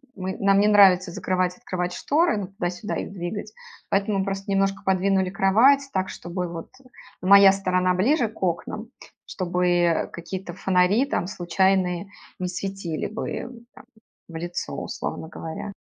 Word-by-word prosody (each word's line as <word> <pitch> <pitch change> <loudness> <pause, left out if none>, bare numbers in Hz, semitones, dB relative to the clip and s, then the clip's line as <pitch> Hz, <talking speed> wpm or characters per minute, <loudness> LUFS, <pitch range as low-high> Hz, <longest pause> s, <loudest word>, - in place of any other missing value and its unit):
мы 190 0 -4
нам 195 0 +4
не 205 - +4
нравится 190 -3 +6
закрывать, 180 +1 -1
открывать 180 -1 -3
шторы, 310 - +1
ну, 200 -2 -4
туда-сюда 185 +1 -4
их - - -4
двигать. 190 - -5 0.4
Поэтому 200 0 +1
просто 195 0 -4
немножко 195 0 +1
подвинули 190 0 +2
кровать 245 +9 +4
так, 190 0 0
чтобы 175 +1 -5
вот, 170 -1 -8
э, - - -19 0.3
моя 195 +1 +8
сторона 185 -1 +1
ближе 235 - +2
к 220 - -17
окнам. 190 +5 -2 0.4
Чтобы 175 -2 +1
какие-то 175 +1 -6
фонари 190 +6 +2
там 230 -10 -2
случайные 185 0 0 0.3
не 180 - -2
светили 185 -2 -4
бы, 220 +2 -5
э, - - -5 0.3
там - - -15 0.4
в 165 - -11
лицо, 175 +2 -4
условно - - -5
говоря. 165 +6 -7
190 Hz, 145 wpm, -24 LUFS, 180-200 Hz, 0.4 s, моя